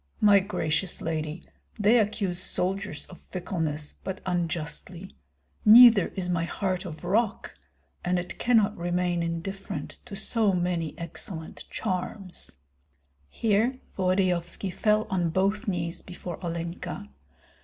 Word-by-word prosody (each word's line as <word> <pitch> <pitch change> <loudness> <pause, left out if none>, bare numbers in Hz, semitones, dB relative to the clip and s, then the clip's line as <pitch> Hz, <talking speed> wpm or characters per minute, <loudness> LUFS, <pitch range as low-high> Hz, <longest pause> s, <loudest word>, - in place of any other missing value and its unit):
My 205 -1 +7
gracious 185 -2 -1
lady, 155 0 -3 0.3
they 220 +3 +5
accuse 200 -4 0
soldiers 185 -3 -2
of 180 - -14
fickleness, 160 -5 -3
but 190 0 -4
unjustly. 175 +1 -3 0.5
Neither 225 -3 +9
is 185 -2 -2
my 175 -2 +1
heart 185 +1 -2
of 160 -2 -8
rock, 210 +4 0 0.5
and 180 0 +1
it 175 0 -5
cannot 220 -4 +3
remain 175 0 0
indifferent 170 +4 -4
to 220 -5 -7
so 215 0 +2
many 175 -3 -1
excellent 170 0 -7
charms." 185 -1 -4 0.8
Here 225 - +1 0.2
Volodyovski 185 -1 +1
fell 215 +2 +2
on 175 -3 +1
both 200 +6 +1
knees 175 -2 -2
before 180 -1 -8
Olenka. 170 - -4
185 Hz, 115 wpm, -27 LUFS, 170-200 Hz, 0.8 s, Neither